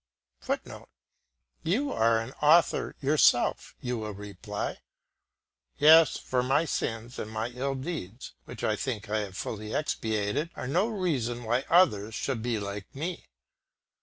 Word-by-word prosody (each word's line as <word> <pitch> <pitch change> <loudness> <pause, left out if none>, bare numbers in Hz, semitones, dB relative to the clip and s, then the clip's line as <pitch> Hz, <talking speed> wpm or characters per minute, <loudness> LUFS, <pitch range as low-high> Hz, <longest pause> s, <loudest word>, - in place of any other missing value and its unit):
[Footnote: - - -5 0.7
You 255 - 0
are 115 - +3
an 115 +3 -5
author 160 +3 +4
yourself, 140 -3 +3
you 125 -2 -2
will 105 -2 -5
reply. 100 -1 -5 1.0
Yes, 155 0 +7
for 125 -1 -1
my 135 +6 +2
sins; 115 -4 -3
and 110 - -4
my 110 +2 -3
ill 135 +3 -3
deeds, 130 - -6
which - - -9
I 110 - +2
think 110 -3 -4
I 110 - +2
have 100 -3 -5
fully 110 0 -4
expiated, 110 0 -1
are - - -5
no 175 - +2
reason 140 - -1
why 120 +4 0
others 110 - +4
should 130 -2 -2
be 120 -1 -1
like 100 +2 -6
me. 165 +5 -5
120 Hz, 140 wpm, -28 LUFS, 110-150 Hz, 1.0 s, Yes